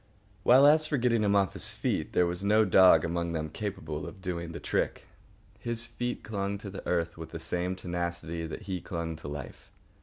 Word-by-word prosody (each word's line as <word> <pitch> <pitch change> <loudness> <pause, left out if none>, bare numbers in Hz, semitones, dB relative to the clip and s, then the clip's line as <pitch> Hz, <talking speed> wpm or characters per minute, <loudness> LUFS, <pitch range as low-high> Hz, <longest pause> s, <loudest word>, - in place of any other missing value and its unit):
While, 130 +7 +7
as 155 +1 +6
for 150 - 0
getting 120 -3 +2
him 100 -1 +3
off 100 -2 +3
his - - -1
feet, - - -2
there 90 - +4
was 90 +2 -2
no 105 +2 +4
dog 90 -6 +6
among 85 0 -2
them 80 -1 -2
capable 80 -8 -4
of 95 - -10
doing 85 -2 -4
the 85 - -6
trick. - - -1 0.5
His 120 0 -3
feet 120 +1 -4
clung 100 -1 -2
to 100 -1 -8
the 95 - -7
earth 85 -1 -1
with 80 - -7
the 80 - -7
same 90 +3 -2
tenacity 85 -2 -3
that 95 - -7
he 95 -3 -4
clung 85 -2 -4
to 75 - -9
life. 70 -2 -8
90 Hz, 205 wpm, -29 LUFS, 85-105 Hz, 0.5 s, While